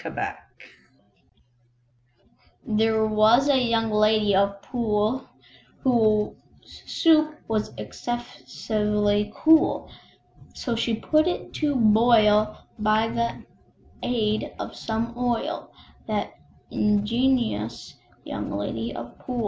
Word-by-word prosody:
There 220 0 +1
was 220 +5 +4
a 280 - +5
Young 225 -2 +1
Lady 215 -1 +3
of 200 +1 +1
Poole, 230 +1 -1 0.6
Whose 220 -5 +2 0.5
soup 310 -2 +3
was 215 -1 -1
excessively 210 -3 -2
cool; 320 0 +3 0.6
So 240 -3 -3
she 230 0 0
put 310 +8 +2
it 355 - -3
to 295 -2 +1
boil 215 -2 +4 0.2
by 215 +1 +2
the 235 0 -2 0.6
aid 215 -3 -1
of - - -6
some 230 +1 -3
oil, 245 -1 -2 0.4
That - - -2 0.4
ingenious 210 - 0 0.3
Young - - -5
Lady 115 +3 -4
of 120 0 -9
Poole. 250 -1 -5
220 Hz, 90 wpm, -24 LUFS, 210-245 Hz, 0.6 s, a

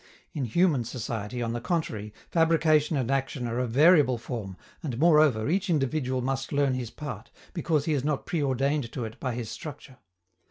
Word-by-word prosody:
In 140 -4 -2
human 145 - +2
society, 115 0 -4
on 115 0 -2
the 120 - -3
contrary, 120 - -2 0.2
fabrication 160 -2 +3
and 130 -1 -1
action 135 -2 -1
are 120 +1 -2
of 125 -2 -1
variable 145 0 +5
form, 115 -5 -6 0.2
and, 130 -7 -4
moreover, 150 -7 +4
each 190 +5 0
individual 135 -4 0
must 135 +1 -2
learn 140 -2 +2
his 125 -3 -3
part, 150 +3 -7 0.2
because 160 -5 0
he 160 - +1
is 140 -3 0
not 150 -1 -1
preordained 140 -4 0
to 125 - -3
it 110 0 -9
by 130 -3 -2
his 115 -3 -5
structure. 140 -4 -9
135 Hz, 175 wpm, -27 LUFS, 120-155 Hz, 0.2 s, variable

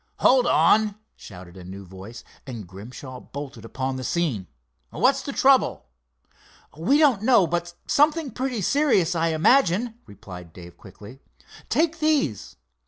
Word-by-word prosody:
"Hold 255 -1 +4
on!" 215 -1 +3 0.2
shouted 90 -2 -12
a 90 - -10
new 95 +2 -9
voice, 95 +6 -11 0.2
and 115 -6 -7
Grimshaw 120 +8 -10
bolted 140 +1 -9
upon 130 0 -4
the 130 - -6
scene. 130 - -2 0.4
"What's - - +2
the - - -5
trouble?" - - +2 0.9
"We 190 - +2
don't 280 -9 +3
know, 230 -4 +4
but 170 +1 -3
something 300 -1 +2
pretty 250 -1 -3
serious, 200 - +2
I 165 -1 0
imagine," 220 - +2
replied 90 -4 -12
Dave, 85 -1 -12
quickly. 105 +7 -14 0.5
"Take 330 +1 +1
these." 295 - 0
160 Hz, 135 wpm, -24 LUFS, -, 0.9 s, Hold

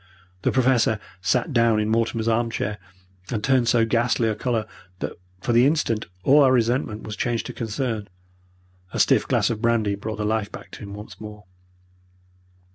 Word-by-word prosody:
The - - +1
Professor 125 -4 +3 0.2
sat 100 - +1
down 115 -3 +4
in 105 - 0
Mortimer's 115 0 0
arm 115 +1 +2
chair, 105 -2 -3 0.5
and 110 -4 -2
turned 130 -3 +3
so 115 -1 +4
ghastly 115 0 +1
a - - +1
colour 115 0 -1 0.3
that - - -4 0.3
for 120 - 0
the 120 +3 +6
instant 130 -8 0 0.2
all 145 +6 +6
our 135 -2 +5
resentment 120 -2 +1
was 105 - -6
changed 120 +1 -1
to - - -6
concern. 110 -2 -3 0.9
A - - -2
stiff - - +4
glass - - +2
of 110 -2 -4
brandy 115 -3 +2
brought 110 +2 -5
the 105 - -2
life 105 -1 -1
back - - -10
to - - -10
him 100 -1 -8
once 105 +1 -11
more. 105 -1 -9
115 Hz, 180 wpm, -24 LUFS, 105-120 Hz, 0.9 s, the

